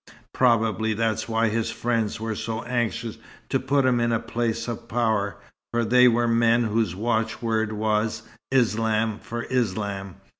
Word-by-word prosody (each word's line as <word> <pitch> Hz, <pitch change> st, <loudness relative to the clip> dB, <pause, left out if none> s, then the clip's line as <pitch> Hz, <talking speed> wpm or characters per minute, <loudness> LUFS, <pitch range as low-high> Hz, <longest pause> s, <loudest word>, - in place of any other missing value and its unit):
Probably 110 Hz, -3 st, +2 dB
that's 110 Hz, 0 st, -1 dB
why 115 Hz, 0 st, +2 dB
his 115 Hz, +1 st, -1 dB
friends 115 Hz, -3 st, -1 dB
were 110 Hz, 0 st, -2 dB
so 110 Hz, +1 st, -4 dB
anxious 120 Hz, -2 st, -2 dB, 0.3 s
to -, -, +1 dB
put 140 Hz, -1 st, +1 dB
him 125 Hz, -2 st, +3 dB
in 120 Hz, 0 st, +1 dB
a 115 Hz, -, +2 dB
place 115 Hz, 0 st, -2 dB
of 115 Hz, 0 st, -5 dB
power, 110 Hz, -4 st, 0 dB, 0.3 s
for 120 Hz, 0 st, +1 dB
they 125 Hz, +2 st, +6 dB
were 120 Hz, 0 st, +3 dB
men 115 Hz, 0 st, +3 dB
whose 110 Hz, -5 st, 0 dB
watchword 110 Hz, 0 st, -1 dB
was 110 Hz, 0 st, 0 dB, 0.3 s
'Islam 110 Hz, -3 st, +1 dB
for 120 Hz, 0 st, -5 dB
Islam.' 100 Hz, -5 st, -2 dB
115 Hz, 150 wpm, -25 LUFS, 110-120 Hz, 0.3 s, they